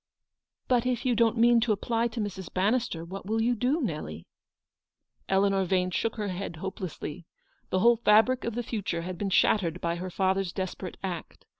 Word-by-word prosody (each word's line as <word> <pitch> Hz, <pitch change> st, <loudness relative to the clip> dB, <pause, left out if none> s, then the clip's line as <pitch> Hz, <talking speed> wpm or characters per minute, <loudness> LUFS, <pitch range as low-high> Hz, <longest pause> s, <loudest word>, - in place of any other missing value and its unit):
"But 250 Hz, -1 st, +2 dB
if 250 Hz, -1 st, -1 dB
you 250 Hz, -, +3 dB
don't 230 Hz, 0 st, +3 dB
mean 235 Hz, +1 st, +6 dB
to 230 Hz, -1 st, +1 dB
apply 230 Hz, +3 st, 0 dB
to 235 Hz, 0 st, -6 dB
Mrs. 190 Hz, -4 st, -4 dB
Ban 195 Hz, +4 st, +2 dB
nister, 230 Hz, -10 st, -2 dB
what 195 Hz, +3 st, -7 dB
will 220 Hz, +1 st, 0 dB
you 235 Hz, +2 st, +2 dB
do, 250 Hz, +7 st, +1 dB
Nelly? 150 Hz, -, -4 dB, 0.5 s
" -, -, -48 dB
Eleanor 195 Hz, 0 st, +3 dB
Yane 185 Hz, 0 st, 0 dB
shook 225 Hz, -, 0 dB
her 210 Hz, -3 st, -3 dB
head 185 Hz, -1 st, -4 dB
hopelessly. 175 Hz, -2 st, -6 dB, 0.4 s
The 185 Hz, -, +1 dB
whole 235 Hz, +2 st, +6 dB
fabric 225 Hz, +3 st, +4 dB
of 230 Hz, -1 st, -3 dB
the 240 Hz, -, -2 dB
future 200 Hz, -7 st, -3 dB
had 180 Hz, 0 st, -6 dB
been 200 Hz, -, -1 dB
shattered 180 Hz, -2 st, +2 dB
by 170 Hz, 0 st, -1 dB
her 185 Hz, +2 st, -5 dB
father's 190 Hz, 0 st, 0 dB
desperate 185 Hz, -1 st, -5 dB
act. 180 Hz, -3 st, -6 dB
195 Hz, 190 wpm, -28 LUFS, 185-230 Hz, 0.5 s, mean